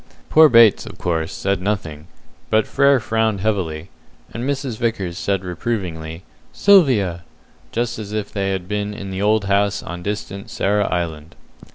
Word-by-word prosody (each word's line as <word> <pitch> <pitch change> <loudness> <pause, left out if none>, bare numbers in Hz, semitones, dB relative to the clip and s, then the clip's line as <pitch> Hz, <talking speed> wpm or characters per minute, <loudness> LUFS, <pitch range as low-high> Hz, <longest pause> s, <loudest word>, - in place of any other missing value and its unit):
Poor 155 0 +7
Bates, 115 -3 +5
of - - -10
course, 80 -1 -2
said 100 -1 -1
nothing, 85 -7 -3 0.4
but 110 0 +3
Frere 140 -1 +3
frowned 110 -3 0
heavily, 90 -6 -2 0.4
and 115 - -4
Mrs. 135 -4 -3
Vickers 100 -7 -2
said 95 0 -1
reprovingly, 90 -4 -4 0.3
"Sylvia!" 125 - +4 0.5
just 120 0 -2
as 105 -2 -7
if 105 -1 -3
they 100 -1 -1
had 95 -2 -3
been 105 0 -3
in 100 -1 -7
the 95 +1 -4
old 105 0 +2
house 100 0 +1
on 85 0 -7
distant 100 0 -5
Sarah 105 +1 0
Island. 80 -2 -3
100 Hz, 155 wpm, -20 LUFS, 90-110 Hz, 0.5 s, Poor